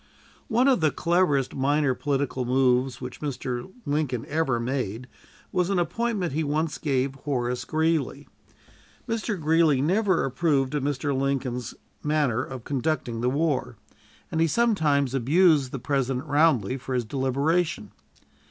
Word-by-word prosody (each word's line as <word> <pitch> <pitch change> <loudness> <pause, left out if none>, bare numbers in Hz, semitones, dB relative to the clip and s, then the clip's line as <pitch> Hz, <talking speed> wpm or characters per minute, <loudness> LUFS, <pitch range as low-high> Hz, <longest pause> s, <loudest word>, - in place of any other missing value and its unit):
One 245 +2 +3
of 260 -9 +3
the 155 - +4
cleverest 150 -6 +1
minor 140 0 +1
political 140 -1 -1
moves 125 0 +2
which 125 -1 -7
Mr. 130 0 -4
Lincoln 145 -5 -1
ever 150 -6 0
made 120 -2 -3 0.5
was 180 -1 +1
an 195 - +1
appointment 180 - -1
he 160 +2 0
once 150 +1 -1
gave 135 -3 0
Horace 125 -3 -2
Greeley. 155 -3 0 0.8
Mr. 225 -3 -2
Greeley 160 -2 +3
never 185 +5 +2
approved 135 -1 +1
of 150 - 0
Mr. 140 0 -1
Lincoln's 130 -3 -2 0.3
manner 145 -6 +1
of 130 -3 -8
conducting 135 -4 -2
the 125 - +2
war, 145 0 -1 0.5
and 160 - 0
he 165 - +4
sometimes 155 - +2
abused 145 +1 +3
the - - -3
President 135 0 -1
roundly 145 -6 +2
for 130 0 -4
his 120 -2 0
deliberation. 135 - 0
140 Hz, 135 wpm, -25 LUFS, 130-160 Hz, 0.8 s, the